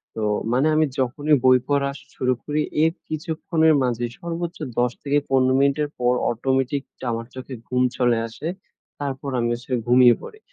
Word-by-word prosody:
তো 110 - -4 0.3
মানে 130 +5 +3
আমি 155 0 +4
যখনই 145 +4 +2
বই 130 0 +7
পড়া 140 -1 +1 0.3
শুরু 130 0 +1
করি 150 +1 -1 0.2
এর 160 - +4 0.2
কিছুক্ষণের 160 0 +1
মাঝে 120 -1 0
সর্বোচ্চ 170 0 -4 0.2
১০ 125 -1 +2
থেকে 145 0 +2
১৫ 130 -1 +3
মিনিটের 140 +2 +2
পর 125 0 +3 0.2
অটোমেটিক 130 +3 0 0.3
আমার 115 0 -3
চোখে 130 +1 -8
ঘুম 125 0 +1
চলে 120 -2 +3
আসে। 115 +7 -7 0.5
তারপর 140 0 -4
আমি 120 0 0
আসলে 125 +1 -3
ঘুমিয়ে 125 -1 +7
পড়ি। 430 - -11
135 Hz, 160 wpm, -23 LUFS, 125-150 Hz, 0.5 s, বই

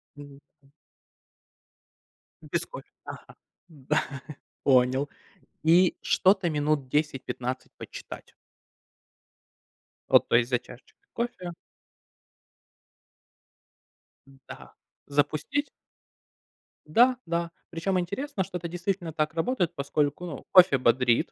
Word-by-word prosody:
Мгм. 145 -1 -12 0.2
М. 140 - -25 1.7
Без - - -2
кофе. - - -10 0.2
Ага. - - -10 0.3
Да. 150 -1 -1 0.6
Понял. 130 +1 +3 0.5
И 170 +3 +5
что-то 190 -1 +3
минут 150 -2 0
10-15 130 -3 -2
почитать. - - -10 1.8
Вот. - - +6
То - - +2
есть 120 0 +3
за 125 -2 +2
чашечкой 125 +1 -16
кофе. 235 -7 -4 3.0
Да. - - -11 0.3
Запустить? 155 - 0 1.2
Да. 245 +11 +4
Да. 170 0 -2 0.2
Причем 185 +3 -1
интересно, 200 - -2
что 180 0 -5
это 175 -1 -5
действительно 175 0 -3
так 155 0 -1
работает, 175 0 0
поскольку, 145 +3 -1
ну, 155 -6 -7
кофе 180 -7 +7
бодрит. 125 -1 +2
160 Hz, 95 wpm, -27 LUFS, 140-180 Hz, 3.0 s, кофе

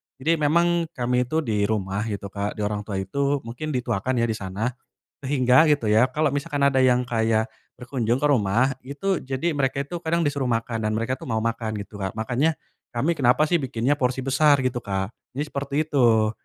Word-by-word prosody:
jadi 160 +5 0
memang 170 +3 +2
kami 125 0 0
itu 160 +4 0
di 105 -4 0
rumah 100 -2 -1
gitu 100 -2 -5
Kak 100 0 -3
di 105 - -3
orang 105 0 -3
tua 100 - -4
itu 140 +9 -1
mungkin 120 +7 -6
dituakan 125 0 -1
ya 120 - +1
di - - -2
sana, 100 +6 -2 0.5
sehingga 130 0 +4
gitu 145 -7 +1
ya 110 +3 +5
kalo 150 -2 +1
misalkan 145 -1 +1
ada 130 -1 +3
yang 125 -1 +3
kayak, 110 -1 +1 0.3
berkunjung 120 -2 -1
ke 150 - +2
rumah 125 0 +2
itu 150 +8 -2
jadi 135 +6 -1
mereka 135 -1 0
itu 175 - -6
kadang 165 +1 +1
disuruh 140 -3 -1
makan 115 0 -1
dan 110 - 0
mereka 115 +3 -1
tuh 135 - -13
mau 110 - +1
makan 110 -1 -2
gitu 100 +1 -9
Kak 95 -2 -3
makanya, 120 +8 0 0.4
kami 135 +8 0
kenapa 125 +2 +4
sih 170 +2 +2
bikinnya 130 +1 0
porsi 130 0 0
besar 145 +2 +4
gitu 125 -1 -1
Kak 95 -1 -3 0.2
jadi 145 - -1
seperti 140 -1 -5
itu, 115 -7 +3
125 Hz, 195 wpm, -24 LUFS, 110-140 Hz, 0.5 s, ya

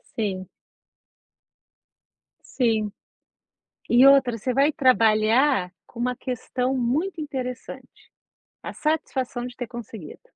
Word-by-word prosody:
Sim. 190 -4 -3 2.1
Sim. 225 -4 +1 1.0
E 245 +2 +6
outra, 265 -4 +5
você 250 +4 -2
vai 280 +4 +3
trabalhar 230 - +3 0.2
com 235 - -13
uma 250 +1 -1
questão 255 +1 -3
muito 305 +9 -1
interessante, 255 -4 -7 0.5
a - - -6
satisfação 260 -5 -2
de 250 - -9
ter 245 -2 -6
conseguido. 220 -9 -9
250 Hz, 100 wpm, -24 LUFS, 225-265 Hz, 2.1 s, E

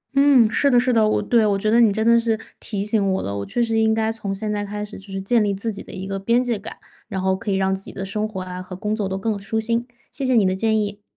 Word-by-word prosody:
嗯， 275 -5 +6
是 280 +4 +3
的 245 - +5
是 250 +1 +1
的， 220 -2 +4
我 - - +1
对， 235 -2 +3
我 205 -2 +2
觉 215 +2 0
得 235 +1 +5
你 220 - +5
真 220 +2 -1
的 235 0 +6
是 225 -1 0 0.2
提 200 -2 -3
醒 210 -3 +1
我 190 - -1
了， 100 0 -3
我 - - -3
确 240 - 0
实 225 -1 +1
应 220 0 +3
该 220 0 0
从 205 -3 -4
现 210 +2 -3
在 205 0 -2
开 210 +1 -5
始 205 - -9
就 195 - -13
是 195 - -3
建 220 +3 +2
立 200 -1 0
自 215 +3 -3
己 200 - -7
的 - - -12
一 190 - -6
个 195 0 -3
边 235 +5 +2
界 235 -4 -1
感， 200 - -9 0.3
然 190 - -4
后 190 0 +1
可 210 +2 -6
以 195 - +1
让 190 0 +1
自 190 - -3
己 - - -9
的 195 - -5
生 210 +2 -2
活 190 -3 -5
啊 185 0 -6
和 185 0 -8
工 210 +3 -2
作 200 -3 -2
都 190 - -2
更 210 +1 -2
舒 220 +3 -2
心。 230 +2 -1 0.2
谢 275 - -5
谢 255 -1 +2
你 210 -4 +4
的 185 - +1
建 220 +2 +1
议。 205 0 -4
210 Hz, 345 characters per minute, -22 LUFS, 195-230 Hz, 0.3 s, 嗯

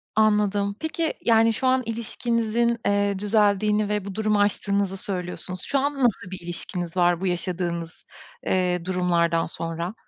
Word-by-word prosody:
Anladım. 210 -2 +2
Peki 320 0 -1
yani 225 0 +5
şu 260 +4 -1
an 260 0 +3
ilişkinizin 235 0 0
eee 200 -1 +1
düzeldiğini 210 0 +2
ve 210 -2 -1
bu 200 -2 -6
durumu 215 -1 +1
aştığınızı 200 -1 0
söylüyorsunuz. 180 -1 -4
Şu 280 - 0
an 285 +2 0
nasıl 230 -8 0
bir 190 - -5
ilişkiniz 175 0 -5
var 175 0 +3
bu 190 - 0
yaşadığınız 175 -2 -3 0.4
eee 180 -2 +1
durumlardan 170 -2 +1
sonra? 165 +3 -4
200 Hz, 145 wpm, -24 LUFS, 180-220 Hz, 0.4 s, yani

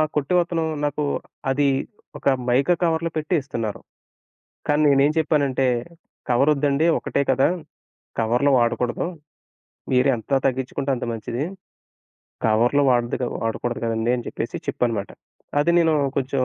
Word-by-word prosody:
కొట్టవతను 170 +2 +1 0.2
నాకు 145 +1 -1 0.5
అది 140 +1 +2 0.5
ఒక - - -4 0.2
మైకా 135 +8 +3
కవర్‌లో 165 0 +1
పెట్టి 155 +3 0
ఇస్తున్నారు. 115 -6 -4 0.9
కానీ 150 +1 +3
నేనేం 140 +2 +4
చెప్పానంటే, 140 -4 +1 0.6
కవరొద్దండి. 140 +4 +3
ఒకటే - - -2
కదా! 135 +1 +4 0.7
కవరులు 120 +5 +2
వాడకూడదు. 120 +1 0 0.9
మీరెంత 125 -1 +2 0.2
తగ్గించుకుంటే 130 +2 -2
అంత 120 - -4
మంచిది. 115 +4 -3 1.0
కవర్లు 120 +6 +3
వాడకూడదు 120 -1 -1
కదండీ! 115 +1 0
అని 120 - -6
చెప్పేసి - - -4
చెప్పానన్నమాట. 115 -5 -1 0.5
అది 170 +4 +2
నేను 165 -2 +3 0.2
కొంచెం 130 0 0
135 Hz, 105 wpm, -23 LUFS, 120-150 Hz, 1.0 s, నేనేం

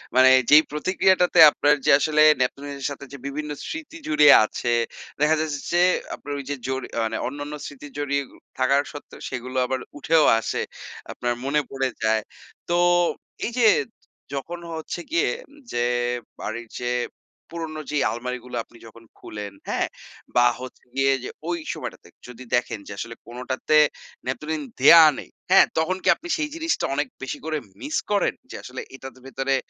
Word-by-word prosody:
মানে 130 0 +7 0.2
যেই 150 +2 +8
প্রতিক্রিয়াটাতে 180 +2 +2
আপনার 145 0 +3
যে, - - +5
আসলে 155 0 +2 0.2
ন্যাপথলিনের 140 +2 -2
সাথে 140 0 -8
যে, - - -6
বিভিন্ন 150 +2 -4 0.2
স্মৃতি 315 +1 -7
জুড়ে 150 -1 +5 0.2
আছে 120 +2 -2 0.5
দেখা 150 +2 +4
যাচ্ছে 150 -3 -3
যে, 175 - +4 0.4
আপনার 145 - -7
ওই 140 - -6
যে, 145 - -1
জরি 130 -1 -3
আ - - +1
মানে 110 0 -2
অন্যান্য 145 +2 -6
স্মৃতি 145 +1 -9
জড়িয়ে 140 -1 0 0.3
থাকা 130 +1 +3 0.2
সত্ত্বেও 145 - -11
সেগুলো 130 0 -5
আবার 130 0 -2 0.2
উঠেও 160 +2 +3
আসে, - - -2 0.5
আপনার 120 0 -2
মনে 150 +2 +2
পড়ে 135 -1 -1
যায়। 110 0 +2 0.5
তো 175 - +2 0.7
এই 235 - -2
যে, 230 -3 +5 0.7
যখন 170 +5 -5
হচ্ছে 160 +2 -5
গিয়ে 345 - +2 0.4
যে, 120 0 0 0.5
বাড়ির 120 +1 -5
যে, 120 - -1 0.6
পুরোনো 160 -2 -5
যে, 150 - 0
আলমারিগুলো 125 +1 -5
আপনি 120 - -19
যখন 115 +1 -15
খুলেন 105 -1 -7 0.2
হ্যাঁ? - - 0 0.5
বা 120 0 +6 0.2
হচ্ছে 130 - -10
গিয়ে 135 0 +3
যে, - - -5 0.2
ওই 175 - 0 0.2
সময়টাতে - - -8 0.2
যদি 125 +1 -10
দেখেন 120 -3 -1
যে, - - -8
আসলে 115 +2 -6
কোনটাতে 130 +5 -1 0.5
ন্যাপথলিন 150 +4 -3 0.2
দেয়া 165 +5 +9
নেই, - - -8 0.2
হ্যাঁ? - - +8
তখন 165 +4 +1
কি - - -3
আপনি 345 - -11
সেই 300 -1 -2
জিনিসটা 330 0 -1
অনেক 145 -1 0 0.2
বেশি 130 - -4
করে 155 -1 -1 0.2
miss 300 +2 -2
করেন 205 - +2 0.2
যে, - - -7
আসলে 130 +1 -7
এটার 135 0 -9
ভেতরে 135 0 -1
140 Hz, 160 wpm, -24 LUFS, 125-155 Hz, 0.7 s, দেয়া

